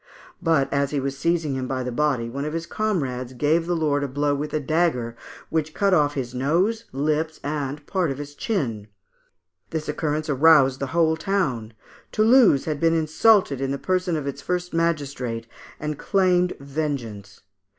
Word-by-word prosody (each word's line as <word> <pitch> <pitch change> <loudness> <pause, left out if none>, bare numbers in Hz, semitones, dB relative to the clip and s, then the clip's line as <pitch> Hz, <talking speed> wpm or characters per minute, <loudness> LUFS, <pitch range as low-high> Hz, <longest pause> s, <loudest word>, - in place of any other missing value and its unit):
But 155 -6 +2
as 140 -1 +1
he 145 - -1
was 135 0 -2
seizing 160 -1 0
him 130 -1 -3
by 130 -1 -2
the 125 - -3
body, 130 -3 0
one 135 +4 -4
of 150 +1 -3
his 165 0 -3
comrades 135 - -2
gave 155 +6 +1
the 175 - +1
lord 145 -3 +1
a - - -1
blow 145 +2 0
with 145 +2 -3
a 155 - 0
dagger, 145 -6 0 0.4
which 155 -1 -1
cut 200 -1 +2
off 145 -4 +3
his 125 -3 -3
nose, 180 - +1
lips, 155 +3 -1
and 145 0 -3
part 185 -2 0
of 135 - -3
his 145 0 -7
chin. 130 - -2 0.8
This 160 -1 -4
occurrence 150 +1 -2
aroused 140 -2 +5
the 140 - -2
whole 160 +1 +2
town. 130 - -1 0.4
Toulouse 220 - +5
had 155 -2 -2
been 165 +1 +3
insulted 160 - +3
in 135 - -1
the 140 - -1
person 185 0 0
of 150 - -4
its 140 - -4
first 180 0 -3
magistrate, 140 -8 -1 0.3
and 150 -1 -4
claimed 180 -2 +2
vengeance. 135 -9 -5
150 Hz, 175 wpm, -24 LUFS, 135-165 Hz, 0.8 s, aroused